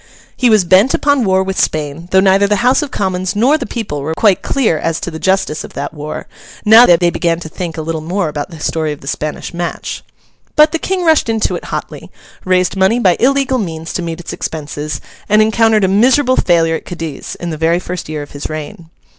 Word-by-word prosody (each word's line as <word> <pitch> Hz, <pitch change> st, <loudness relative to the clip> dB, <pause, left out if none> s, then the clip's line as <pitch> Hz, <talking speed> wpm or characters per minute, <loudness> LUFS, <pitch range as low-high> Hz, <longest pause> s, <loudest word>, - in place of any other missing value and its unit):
He 250 Hz, -, +2 dB
was 215 Hz, -4 st, +4 dB
bent 190 Hz, +9 st, +4 dB
upon 285 Hz, -4 st, +1 dB
war 190 Hz, 0 st, +2 dB
with 190 Hz, 0 st, -3 dB
Spain, 155 Hz, +2 st, -2 dB
though 190 Hz, -, +4 dB
neither 195 Hz, +1 st, +4 dB
the 210 Hz, +3 st, 0 dB
House 255 Hz, +1 st, +4 dB
of 295 Hz, -, -4 dB
Commons 185 Hz, -3 st, -2 dB
nor 250 Hz, +8 st, +3 dB
the 280 Hz, -5 st, -3 dB
people 195 Hz, -, -4 dB
were 160 Hz, +3 st, -3 dB
quite 205 Hz, -2 st, +3 dB
clear 225 Hz, -, 0 dB
as 165 Hz, 0 st, -1 dB
to 175 Hz, -, -4 dB
the 160 Hz, -, -7 dB
justice 190 Hz, -5 st, 0 dB
of -, -, -11 dB
that -, -, -5 dB
war, 150 Hz, 0 st, -6 dB, 0.4 s
now 225 Hz, +3 st, +8 dB
that 170 Hz, -1 st, +5 dB
they 175 Hz, -1 st, +3 dB
began 170 Hz, -1 st, 0 dB
to 160 Hz, -, -6 dB
think 165 Hz, 0 st, -6 dB
a 160 Hz, -, -3 dB
little 160 Hz, 0 st, -3 dB
more 175 Hz, +3 st, -2 dB
about 145 Hz, 0 st, -4 dB
the 165 Hz, -3 st, -11 dB
story 155 Hz, -1 st, -1 dB
of 150 Hz, -, -12 dB
the 135 Hz, -, -12 dB
Spanish 155 Hz, +4 st, -4 dB
match. 175 Hz, 0 st, -4 dB, 0.5 s
But 300 Hz, 0 st, +6 dB
the 330 Hz, -, -1 dB
King 375 Hz, +1 st, -2 dB
rushed 315 Hz, -7 st, +3 dB
into 225 Hz, -1 st, 0 dB
it -, -, -7 dB
hotly, -, -, -6 dB, 0.4 s
raised 185 Hz, 0 st, +1 dB
money 190 Hz, +4 st, +3 dB
by 185 Hz, -7 st, +3 dB
illegal 265 Hz, 0 st, +2 dB
means 165 Hz, -5 st, -5 dB
to -, -, -2 dB
meet 165 Hz, 0 st, -5 dB
its 175 Hz, -, -7 dB
expenses, 150 Hz, -1 st, -5 dB, 0.3 s
and 210 Hz, +1 st, +4 dB
encountered 220 Hz, 0 st, +3 dB
a -, -, +4 dB
miserable 255 Hz, +7 st, +3 dB
failure 165 Hz, -5 st, +2 dB
at -, -, -14 dB
Cadiz, 165 Hz, -5 st, -6 dB
in 175 Hz, -1 st, -5 dB
the -, -, -3 dB
very 165 Hz, +2 st, +2 dB
first 180 Hz, -2 st, -6 dB
year 155 Hz, -1 st, -4 dB
of 145 Hz, -, -13 dB
his 145 Hz, -, -6 dB
reign. 155 Hz, +2 st, -7 dB
180 Hz, 230 wpm, -15 LUFS, 160-220 Hz, 0.5 s, now